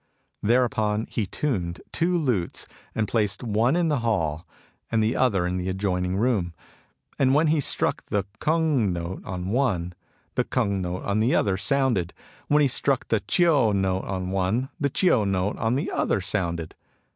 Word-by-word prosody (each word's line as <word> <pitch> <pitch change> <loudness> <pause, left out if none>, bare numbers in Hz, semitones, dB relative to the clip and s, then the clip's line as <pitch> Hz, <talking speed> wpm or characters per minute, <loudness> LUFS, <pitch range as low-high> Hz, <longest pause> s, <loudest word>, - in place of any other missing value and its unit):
Thereupon 110 -2 +1
he 105 -4 -1
tuned 90 -10 -2
two 175 +1 +1
lutes, 120 - -1 0.3
and 110 -1 0
placed 110 +1 0
one 115 +5 +2
in 175 -1 +2
the 145 -3 +1
hall 85 -8 -1 0.4
and 115 -1 +2
the 110 +2 +1
other 100 -9 +2
in 90 +1 -1
the 90 +1 -2
adjoining 95 -1 -1
room. 100 -7 0 0.6
And 135 0 +4
when 155 +2 +4
he 155 0 +3
struck 140 - 0
the 100 -1 0 0.2
kung 155 - +2
note 85 +1 -5
on 90 0 -5
one, 100 -8 0 0.4
the - - +1
bung 100 -6 0
note 90 0 -4
on 100 +1 0
the 115 +4 +2
other 100 -2 +2
sounded; 100 -3 0 0.3
when 150 0 +4
he - - +5
struck 135 +1 0
the 115 - +2
chio 145 - +3
note 95 -1 0
on 95 -1 -3
one, 95 +8 0
the 140 -2 +1
chio 140 - +3
note 95 0 0
on 110 +2 0
the 140 - -2
other - - +1
sounded. 85 -5 -2
105 Hz, 170 wpm, -25 LUFS, 95-130 Hz, 0.6 s, he